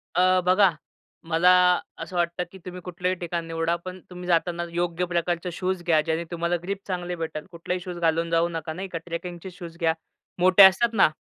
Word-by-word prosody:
अ, 185 Hz, +1 st, +4 dB
बघा, 190 Hz, +1 st, +5 dB, 0.6 s
मला 170 Hz, +2 st, +4 dB, 0.5 s
असं 165 Hz, +2 st, -7 dB
वाटतं 175 Hz, +1 st, 0 dB
की 190 Hz, -, -11 dB
तुम्ही 180 Hz, 0 st, -7 dB
कुठल्याही 180 Hz, +1 st, -2 dB
ठिकाण 170 Hz, -1 st, -3 dB
निवडा, 165 Hz, +1 st, 0 dB
पण 185 Hz, 0 st, -7 dB
तुम्ही 180 Hz, 0 st, -8 dB
जाताना 170 Hz, 0 st, +1 dB
योग्य 175 Hz, +1 st, -1 dB
प्रकारचे 175 Hz, 0 st, -1 dB
शूज 185 Hz, +1 st, -2 dB
घ्या, 165 Hz, -3 st, +3 dB
ज्याने 160 Hz, +1 st, -1 dB
तुम्हाला 170 Hz, 0 st, 0 dB
ग्रिप 195 Hz, +1 st, -3 dB
चांगले 180 Hz, -1 st, -3 dB
भेटेल. 160 Hz, -2 st, -5 dB
कुठलेही 180 Hz, +1 st, -3 dB
शूज 180 Hz, -1 st, -6 dB
घालून 165 Hz, 0 st, +1 dB
जाऊ 165 Hz, 0 st, +3 dB
नका, 160 Hz, -1 st, -4 dB
नाही 190 Hz, +3 st, -5 dB
का. 175 Hz, -, -5 dB
ट्रेकिंगचे 175 Hz, +1 st, -6 dB
शूज 170 Hz, -2 st, -10 dB
घ्या. 165 Hz, -2 st, +2 dB, 0.5 s
मोठे 185 Hz, +2 st, +7 dB
असतात 195 Hz, +5 st, +6 dB
ना. 195 Hz, -, +5 dB
175 Hz, 185 wpm, -25 LUFS, 170-180 Hz, 0.6 s, मोठे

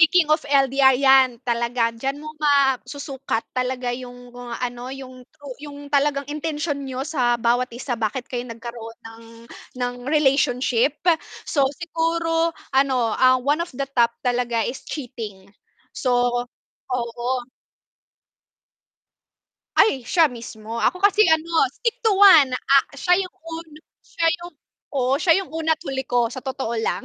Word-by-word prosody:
Speaking 330 Hz, -1 st, +5 dB
of 310 Hz, -, +3 dB
LDR, 270 Hz, -1 st, +4 dB
'yan 265 Hz, -2 st, +5 dB
talaga, 235 Hz, -1 st, 0 dB
d'yan 270 Hz, +4 st, -3 dB
mo 305 Hz, +1 st, -8 dB
masusukat 275 Hz, -3 st, 0 dB
talaga, 255 Hz, -1 st, -2 dB
yung 245 Hz, 0 st, -9 dB
kung 245 Hz, 0 st, -10 dB
ano 245 Hz, 0 st, -5 dB
yung 260 Hz, -1 st, -9 dB
true 290 Hz, -3 st, -11 dB, 0.2 s
yung 285 Hz, 0 st, -10 dB
talagang 285 Hz, 0 st, +2 dB
intensyon 300 Hz, -1 st, -3 dB
niyo 265 Hz, -1 st, -4 dB
sa 255 Hz, -6 st, +1 dB
bawat 240 Hz, +2 st, +1 dB
isa, 255 Hz, +1 st, -4 dB
bakit 235 Hz, +2 st, -2 dB
kayo 245 Hz, -1 st, -4 dB
nagkaroon 230 Hz, 0 st, -8 dB
ng, 225 Hz, 0 st, -12 dB, 0.5 s
ng 245 Hz, 0 st, -2 dB
relationship. 270 Hz, -3 st, +2 dB, 0.5 s
So, 275 Hz, -3 st, +1 dB
siguro, 330 Hz, 0 st, -1 dB, 0.2 s
ano, 260 Hz, -4 st, +2 dB
ah, 255 Hz, 0 st, +6 dB
one 285 Hz, +5 st, 0 dB
of 340 Hz, -, -2 dB
the 275 Hz, -, -1 dB
top 240 Hz, -4 st, +1 dB
talaga, 240 Hz, -2 st, 0 dB
is 260 Hz, -, -4 dB
cheating 215 Hz, -8 st, -7 dB, 0.4 s
so 245 Hz, -2 st, +1 dB, 0.6 s
oo. 245 Hz, 0 st, -2 dB, 2.3 s
Ay, 270 Hz, -, +4 dB
siya 325 Hz, +5 st, +3 dB
mismo, 230 Hz, -2 st, -8 dB
ako 295 Hz, +11 st, 0 dB
kasi, 410 Hz, +2 st, +5 dB
ano, 320 Hz, +1 st, +1 dB, 0.2 s
stick 465 Hz, +6 st, -2 dB
to 440 Hz, -, +4 dB
one, 375 Hz, -9 st, +7 dB
ah, 275 Hz, +2 st, +3 dB
siya 355 Hz, +6 st, +2 dB
yung 365 Hz, -, -11 dB
un 330 Hz, 0 st, -8 dB, 0.4 s
siya 330 Hz, -, 0 dB, 0.2 s
yung 350 Hz, -, -9 dB, 0.4 s
oo, 265 Hz, -1 st, +1 dB
siya 330 Hz, +3 st, +3 dB
yung 385 Hz, -, -8 dB
una 320 Hz, 0 st, 0 dB
at 315 Hz, -, -3 dB
huli 270 Hz, -5 st, -4 dB
ko 245 Hz, -2 st, +1 dB
sa 255 Hz, +2 st, -9 dB
totoo 260 Hz, -3 st, -3 dB
lang. 225 Hz, -, -2 dB
265 Hz, 145 wpm, -22 LUFS, 245-300 Hz, 2.3 s, one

